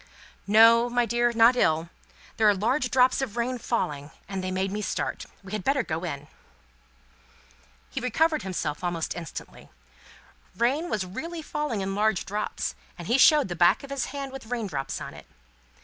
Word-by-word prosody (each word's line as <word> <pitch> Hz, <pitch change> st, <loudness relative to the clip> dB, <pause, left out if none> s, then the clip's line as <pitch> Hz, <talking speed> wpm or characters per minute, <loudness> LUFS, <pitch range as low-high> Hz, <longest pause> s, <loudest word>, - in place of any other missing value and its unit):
"No, 230 Hz, +3 st, +6 dB
my 245 Hz, 0 st, +2 dB
dear, 240 Hz, +1 st, +1 dB
not 230 Hz, +2 st, +5 dB
ill. 160 Hz, -7 st, +1 dB, 0.5 s
There 220 Hz, -1 st, +5 dB
are 205 Hz, -, +3 dB
large 250 Hz, +7 st, 0 dB
drops 255 Hz, +1 st, +3 dB
of 240 Hz, -4 st, -4 dB
rain 245 Hz, +1 st, -1 dB
falling, 145 Hz, -12 st, -2 dB, 0.2 s
and 195 Hz, -1 st, -4 dB
they 185 Hz, -, -2 dB
made 190 Hz, +1 st, -1 dB
me 210 Hz, +1 st, -3 dB
start. -, -, -3 dB, 0.2 s
We 190 Hz, -, -11 dB
had 210 Hz, -3 st, -3 dB
better 275 Hz, +2 st, +2 dB
go 160 Hz, -2 st, -4 dB
in." 145 Hz, -4 st, -5 dB, 1.6 s
He -, -, -4 dB
recovered 310 Hz, +6 st, +1 dB
himself 170 Hz, -5 st, -3 dB
almost 175 Hz, -2 st, -2 dB
instantly. 170 Hz, -3 st, -9 dB, 0.9 s
Rain 275 Hz, -, +1 dB
was 205 Hz, -3 st, -1 dB
really 320 Hz, -, -6 dB
falling 295 Hz, -9 st, -2 dB
in 195 Hz, 0 st, -2 dB
large 210 Hz, -1 st, +1 dB
drops, 210 Hz, +2 st, -3 dB, 0.2 s
and 175 Hz, -, -8 dB
he 245 Hz, +3 st, +3 dB
showed 300 Hz, -2 st, +6 dB
the 175 Hz, -, -4 dB
back 175 Hz, +8 st, +4 dB
of 275 Hz, -, -10 dB
his 275 Hz, -3 st, -1 dB
hand 275 Hz, -1 st, -6 dB
with 270 Hz, -4 st, -9 dB
rain 235 Hz, -2 st, -2 dB
drops 140 Hz, -8 st, -4 dB
on -, -, -7 dB
it. -, -, -13 dB
225 Hz, 180 wpm, -26 LUFS, 185-255 Hz, 1.6 s, No